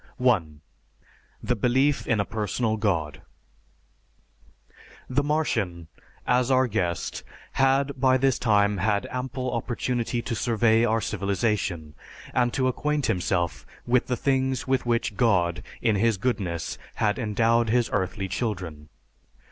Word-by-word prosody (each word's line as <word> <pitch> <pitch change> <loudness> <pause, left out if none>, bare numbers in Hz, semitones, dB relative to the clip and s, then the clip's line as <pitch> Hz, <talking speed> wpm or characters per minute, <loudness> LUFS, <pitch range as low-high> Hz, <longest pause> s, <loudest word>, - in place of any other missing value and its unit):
(1) 85 -13 +1 0.8
The 125 - 0
belief 130 +6 +1
in 115 - +2
a 100 - +1
personal 110 +1 -1
God: 85 -10 -1 1.9
The 130 +2 +1
Martian, 110 - -1 0.4
as 125 +1 +2
our 130 0 +4
guest, 95 -7 -2 0.3
had 135 +1 +2
by 130 0 +4
this 135 -1 +2
time 105 -3 +3
had 100 +2 +1
ample 130 0 -3
opportunity 120 0 -2
to 120 - -3
survey 115 0 +2
our 115 -1 +1
civilization, 95 -5 -1 0.4
and 120 -1 +2
to 130 0 0
acquaint 150 +2 0
himself 85 -7 -1 0.2
with 125 0 +2
the 125 - -1
things 130 -1 0
with 130 -2 0
which 115 -2 0
God 90 -8 +2 0.2
in 110 -3 +3
His 110 0 +2
goodness 95 -8 -2 0.2
had 105 +2 0
endowed 115 +1 +2
His 120 +1 +2
earthly 95 0 -1
children. 90 -8 -4
115 Hz, 125 wpm, -25 LUFS, 100-125 Hz, 1.9 s, our